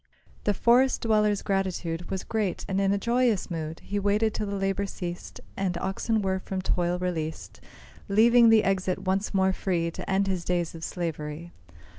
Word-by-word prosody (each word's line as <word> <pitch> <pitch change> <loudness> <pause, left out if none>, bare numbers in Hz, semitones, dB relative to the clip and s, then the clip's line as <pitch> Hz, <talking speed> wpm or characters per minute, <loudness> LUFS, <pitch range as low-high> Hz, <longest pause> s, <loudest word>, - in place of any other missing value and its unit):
The 205 - +2
forest 250 +5 +4
dweller's 210 -2 +2
gratitude 180 -3 -2
Was 190 -1 -3
great, 215 -5 -2
and 195 0 0
in 195 0 +2
a 200 - +2
joyous 235 -2 +1
mood 160 -1 -4
He 205 - -3
waited 205 +2 +1
till 210 - -3
the 200 - -3
labour 195 0 -1
ceased, 175 -2 -6 0.2
And 185 -3 -1
oxen 205 +4 -1
were 190 0 0
from 190 0 -4
toil 175 -1 0
released, 165 -3 -4 0.5
Leaving 230 +3 +6
the 225 -1 +6
exit 190 -1 0
once 195 +2 0
more 190 -1 +2
free, 170 -3 -1
To - - -8
end 195 +1 +2
his 185 -3 -2
days 175 -2 -1
of 165 -1 -9
slavery. 165 -1 -4
195 Hz, 175 wpm, -27 LUFS, 175-205 Hz, 0.5 s, Leaving